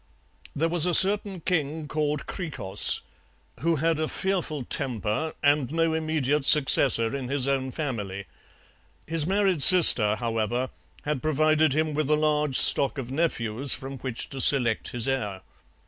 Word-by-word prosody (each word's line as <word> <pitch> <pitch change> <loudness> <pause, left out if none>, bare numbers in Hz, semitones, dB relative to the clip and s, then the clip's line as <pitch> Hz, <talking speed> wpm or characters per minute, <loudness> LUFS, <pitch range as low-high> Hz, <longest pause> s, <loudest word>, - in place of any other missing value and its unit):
There 160 +3 0
was 170 0 +1
a 175 - +3
certain 195 -1 +3
king 155 -3 -3
called 150 0 -3
Hkrikros, 130 - -2 0.6
who 165 +1 0
had 160 +1 -1
a 155 - -2
fearful 175 -8 -4
temper 120 +5 -3
and 145 -2 +1
no 165 0 -1
immediate 155 -3 -2
successor 135 -5 +3
in 135 -2 -6
his 135 0 -1
own 135 -1 -2
family; 105 -9 -6 0.8
his 160 -1 -2
married 195 -4 0
sister, 130 - +6
however, 115 +2 -3 0.3
had 145 -3 -4
provided 155 -1 +1
him 155 +1 -1
with 150 -1 -2
a 155 - +3
large 150 -2 0
stock 140 +1 +5
of 130 -2 -7
nephews 135 -4 -1
from 135 0 -9
which 130 -3 -4
to 135 -1 -6
select 120 -6 +2
his 120 0 -2
heir. 105 -8 -4
145 Hz, 145 wpm, -24 LUFS, 125-160 Hz, 0.8 s, sister